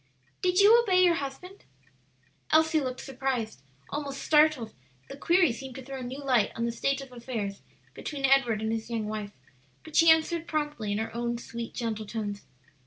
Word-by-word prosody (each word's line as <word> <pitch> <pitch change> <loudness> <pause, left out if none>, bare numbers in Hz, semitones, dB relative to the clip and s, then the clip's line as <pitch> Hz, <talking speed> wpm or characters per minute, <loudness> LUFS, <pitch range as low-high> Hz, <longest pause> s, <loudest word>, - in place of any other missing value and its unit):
"Did 365 0 +2
you 440 +4 +7
obey 370 -5 +3
your 350 -1 +5
husband?" 335 +6 -6 0.9
Elsie 315 0 +4
looked 255 -1 -4
surprise, 255 - -3 0.3
almost 280 -2 -4
startled; 300 -7 +3 0.4
the - - -6
query 340 +1 +3
seemed 265 +1 -9
to 265 - -8
throw 270 -1 -6
new 260 +3 -6
light 250 -6 +2
on 230 - -1
the 235 - -1
state 275 +4 -1
of 270 -1 -11
affairs 230 -5 -5 0.3
between 280 -3 -4
Edward 245 -5 +3
and 220 - -1
his 225 0 -3
young 225 -2 -2
wife; 210 -1 -5 0.5
but 315 -1 -11
she 330 -1 +6
answered 320 +1 +3
promptly 295 -9 -2
in 205 - 0
her 220 +1 -3
own 235 0 -1
sweet, 235 0 -7
gentle 220 -3 -3
tones. 205 -2 -4
265 Hz, 175 wpm, -28 LUFS, 230-310 Hz, 0.9 s, you